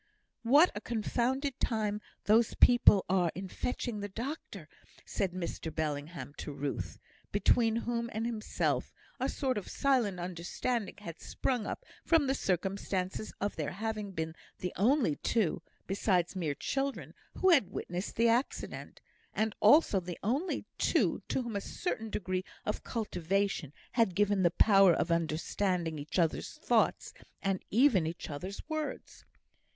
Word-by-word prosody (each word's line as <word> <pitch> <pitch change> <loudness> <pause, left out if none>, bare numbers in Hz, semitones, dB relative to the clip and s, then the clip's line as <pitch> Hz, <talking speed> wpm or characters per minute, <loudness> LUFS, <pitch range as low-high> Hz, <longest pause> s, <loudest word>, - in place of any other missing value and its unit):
"What 285 +9 +6
a 205 - -5
confounded 250 +4 -1
time 210 -2 0 0.2
these 220 +2 +4
people 240 -5 +6
are 180 -3 +2
in 190 +1 -5
fetching 235 +2 -3
the 205 0 -4
doctor," 255 +10 -6 0.4
said 190 -2 -1
Mr 170 -2 -4
Bellingham 145 -2 -4
to - - -5
Ruth, 140 0 -4 0.3
between 225 -2 +3
whom 235 0 -1
and 220 +2 -2
himself 225 -2 -1 0.2
a - - 0
sort 260 -6 0
of 200 - -11
silent 240 -9 +1
understanding 185 +6 -3
had 170 -6 -9
sprung 245 -5 -1
up - - -5 0.2
from 330 -4 +4
the 270 - +2
circumstance 190 -1 -2
of 205 +1 -1
their 155 -3 -2
having 215 +1 -3
been 160 -3 -4 0.2
the 180 - -4
only 225 - +3
two 215 -8 0 0.2
(besides 190 -2 +1
mere 160 -6 -1
children) 275 - -2 0.2
who 375 - +4
had 270 - +5
witnessed 180 +3 -4
the 230 +1 +4
accident, 240 +4 -1 0.3
and 215 0 +1
also 295 -10 +6
the 175 -1 -6
only 275 - -1
two - - +2
to 260 - 0
whom 235 -3 -5
a 200 - -1
certain 225 - -3
degree 185 -2 -2 0.2
of 210 - -2
cultivation 195 - -1 0.2
had 225 -7 +2
given 205 -1 +3
the 175 - +5
power 195 -1 +6
of 170 - 0
understanding 170 +1 0
each 145 +5 -5
other's 165 -3 +1
thoughts - - +1 0.3
and 195 -2 0
even 220 - +4
each 165 0 -5
other's 185 - -6
words. 310 -1 -5
205 Hz, 145 wpm, -32 LUFS, 175-235 Hz, 0.4 s, What